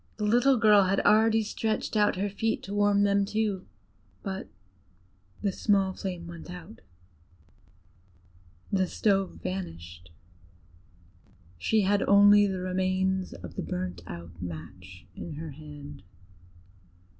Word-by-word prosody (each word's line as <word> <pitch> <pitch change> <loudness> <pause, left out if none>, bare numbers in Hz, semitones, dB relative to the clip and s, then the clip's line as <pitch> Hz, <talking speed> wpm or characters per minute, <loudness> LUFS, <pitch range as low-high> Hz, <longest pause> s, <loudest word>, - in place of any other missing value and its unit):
The 210 - -2
little 245 +5 +4
girl 210 -3 +6
had 195 +1 +1
already 220 +1 +4
stretched 220 +1 -2
out 210 -1 +3
her 195 +3 -1
feet 220 +3 -2
to 195 - -6
warm 205 0 +3
them 200 0 +3
too; 205 -2 -2 0.6
but 190 - -5 1.0
the 200 - +1
small 195 -1 +1
flame 180 -3 -5
went 170 0 -10
out, 180 +4 -10 1.9
the 190 -2 +2
stove 195 -2 0
vanished: 85 - -6 1.5
she 215 - +2
had 200 +1 +2
only 205 +1 +7
the 190 -2 -3
remains 185 0 0
of 90 -1 -9
the - - -3
burnt 90 -1 -4
out 85 0 -9
match 90 +2 -9
in 165 - -7
her 155 +1 -7
hand. 145 -1 -11
190 Hz, 120 wpm, -28 LUFS, 150-205 Hz, 1.9 s, only